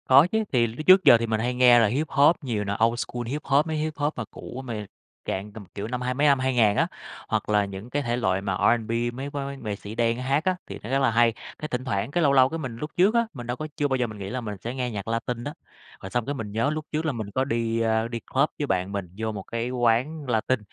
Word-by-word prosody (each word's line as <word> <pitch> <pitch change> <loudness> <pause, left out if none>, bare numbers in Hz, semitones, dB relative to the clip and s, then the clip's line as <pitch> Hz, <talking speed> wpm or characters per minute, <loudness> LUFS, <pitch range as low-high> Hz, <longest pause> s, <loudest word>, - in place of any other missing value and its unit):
Có 135 +5 +7
chứ. 220 0 +1
Thì 120 -3 +3
lúc 120 +8 -7
trước 185 +1 +8
giờ 120 - +8
thì 115 0 -2
mình 110 -1 0
hay 120 +3 0
nghe 125 -1 +6
là 115 - +4
Hip-hop 145 +3 +3
nhiều 115 -7 -2
nè, 100 0 -2
Old 115 +1 0
School 120 -1 -4
Hip-hop, 145 +1 +1
mấy 160 -1 -2
Hip-hop 150 -1 -1
mà 125 - -3
cũ, 130 - -8
mà 110 -4 -4 0.4
dạng 100 +2 -3
tầm 105 -2 -9
kiểu 100 +1 -4
năm 125 +1 -3
hai 125 0 -1
mấy 145 +3 +2
năm 140 -2 +4
2000 120 -6 +3
á, - - +3 0.4
hoặc - - -1
là 105 -1 +3
những 100 +4 -8
cái 145 +3 -1
thể 120 -1 -1
loại 95 -5 +1
mà 100 -1 -2 0.2
R&B, 110 -1 -9 0.2
mấy 135 +3 -5
mấy 140 -1 -5
nghệ 110 -6 -4
sĩ 100 +2 -9
đen 115 0 +1
hát 135 +4 0
á, 185 0 +2
thì - - -7
nó 110 - -6
rất 135 +1 +2
là 135 -3 +3
hay. 115 0 +4 0.3
Cái 155 - -4
thỉnh 125 -2 -3
thoảng, 100 0 -1
cái 175 +3 +1
lâu 140 -2 +4
lâu, 130 -1 +6
cái 165 - -3
mình 130 -6 -5
lúc 150 +4 -5
trước 190 +5 +5
á, 235 0 +4
mình 120 -5 -8
đâu 120 +1 -2
có 155 - -4
chưa 145 - +2
bao 130 -1 0
giờ 125 -1 0
mình 110 -1 -9
nghĩ 100 -1 -6
là 125 +2 -3
mình 105 -3 -5
sẽ 120 - -3
nghe 125 -2 -2
nhạc 100 -2 -5
Latin 115 +1 -2
đó. 145 - -5 0.5
Rồi 95 - -7
xong 120 +3 -1
cái 145 - -2
mình 110 -5 -5
nhớ 115 +6 +1
lúc 155 0 -3
trước 155 +1 -1
là 155 - +1
mình 110 -5 -5
có 130 +6 0
đi, 115 -2 -1
a, 110 0 +1
đi 115 0 -4
club - - 0
với - - 0
bạn 90 +2 0
mình, 100 -3 -4
vô 110 0 -2
một 100 -3 -6
cái 115 +3 -3
quán 125 +4 0
Latin. 120 +2 +1
120 Hz, 285 wpm, -25 LUFS, 110-140 Hz, 0.5 s, trước